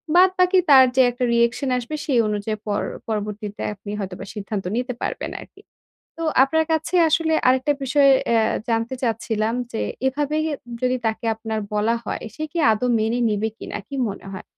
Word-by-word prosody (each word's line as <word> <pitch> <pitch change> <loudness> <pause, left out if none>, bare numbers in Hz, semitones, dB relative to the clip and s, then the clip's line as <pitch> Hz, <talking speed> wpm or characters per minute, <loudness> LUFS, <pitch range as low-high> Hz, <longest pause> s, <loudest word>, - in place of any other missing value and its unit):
বাদবাকি 370 0 +5
তার 265 -2 +9
যে 260 - +6
একটা 245 +1 -4
reaction 235 +4 +1
আসবে 250 +5 -4
সেই 260 -5 +2
অনুযায়ী 210 +1 -2
পর 205 0 0 0.3
পরবর্তীতে 210 -1 -4
আপনি 205 0 -9
হয়তোবা 190 -1 -5
সিদ্ধান্ত 210 -1 -4
নিতে 250 +1 -2
পারবেন - - -3
আরকি! - - -15 0.6
তো 330 - -4 0.2
আপনার 320 +3 +1
কাছে 320 +3 -1
আসলে 320 0 +2
আরেকটা 260 +3 +3
বিষয় 275 +1 +4 0.2
এ্যা 225 -1 +4 0.3
জানতে 230 +2 0
চাচ্ছিলাম 225 -1 -1 0.2
যে, 225 - -3 0.3
এভাবে 290 +3 -1 0.3
উম 240 - -8
যদি 255 0 +1
তাকে 220 +1 -1
আপনার 220 -1 -4
বলা 215 +3 +1
হয়, - - -4
সে 310 - -5
কি 345 - -5
আদৌ 220 +3 0
মেনে 225 +3 0
নিবে 215 +1 0
কিনা? - - -6
কী 280 - -7
মনে 195 - -8
হয়? 190 - -7
235 Hz, 175 wpm, -22 LUFS, 215-275 Hz, 0.6 s, তার